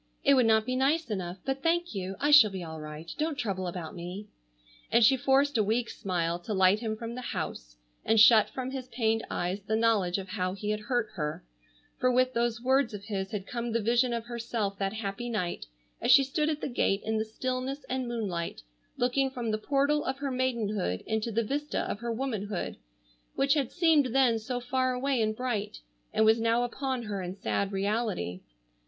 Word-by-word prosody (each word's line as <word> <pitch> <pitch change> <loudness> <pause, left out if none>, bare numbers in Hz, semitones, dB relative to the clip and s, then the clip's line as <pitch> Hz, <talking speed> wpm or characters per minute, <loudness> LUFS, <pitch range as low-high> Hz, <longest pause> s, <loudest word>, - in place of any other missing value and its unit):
It 280 - +5
would 255 -4 +4
not 220 -1 +4
be 255 +1 -1
nice 275 +1 +1
enough, 185 -3 -3
but 270 0 -2
thank 345 +2 +1
you. 190 -1 -4
I 290 +1 +2
shall 290 -8 +9
be 190 -2 -6
all 160 -1 -7
right. 150 +1 -8
Don't 310 -1 -1
trouble 190 -7 -2
about 175 0 -5
me," 180 +4 -7 0.6
and 235 - +6
she 265 +4 +6
forced 270 0 +2
a - - +4
weak 230 +3 0
smile 175 -4 -2
to 205 +4 -4
light 190 +2 +4
him 220 -1 -3
from 230 +1 -6
the 250 - -6
house, - - -5 0.3
and 225 0 +3
shut 220 0 +7
from 260 0 -5
his 260 -2 -5
pained 225 -3 0
eyes 180 +3 -2
the 215 +2 -1
knowledge 220 -5 +2
of 195 -1 -6
how 185 -2 -2
he 210 +2 -3
had 210 - -1
hurt 230 +1 -1
her, 150 - -4 0.5
for 255 - +3
with 255 +1 +2
those 235 -1 0
words 260 -3 +2
of 200 - -8
his 195 -2 -3
had 195 -2 -4
come 235 +1 -4
the 230 - +2
vision 240 +3 +2
of 230 -1 -3
herself 230 -4 -3
that 195 0 -1
happy 220 +2 -4
night 180 - -3 0.3
as - - -1
she 275 +2 +8
stood 300 +3 0
at 305 -1 -2
the - - -2
gate 205 -6 0
in 220 0 0
the - - +1
stillness 255 +5 -4
and 260 -1 -2
moonlight 200 - -3 0.3
looking 265 +2 +1
from 240 -4 -3
the 215 - -1
portal 285 +5 +1
of 265 +1 -2
her 275 -1 -3
maidenhood 220 - -1
into 220 +1 -1
the 230 +2 +1
vista 290 +6 -2
of - - -4
her 235 0 -3
womanhood, 215 -6 -3 0.6
which 275 +1 +3
had 280 -5 0
seemed 320 -5 +4
then 245 -4 +4
so 245 +3 -3
far 255 +1 0
away 260 -1 0
and 215 0 0
bright, 215 -4 -3 0.3
and 220 - +3
was 220 +1 +4
now 230 +1 +2
upon 260 0 -2
her 205 -3 -4
in 180 +1 -5
sad 200 0 -1
reality. 195 - -1
230 Hz, 210 wpm, -29 LUFS, 200-255 Hz, 0.6 s, shall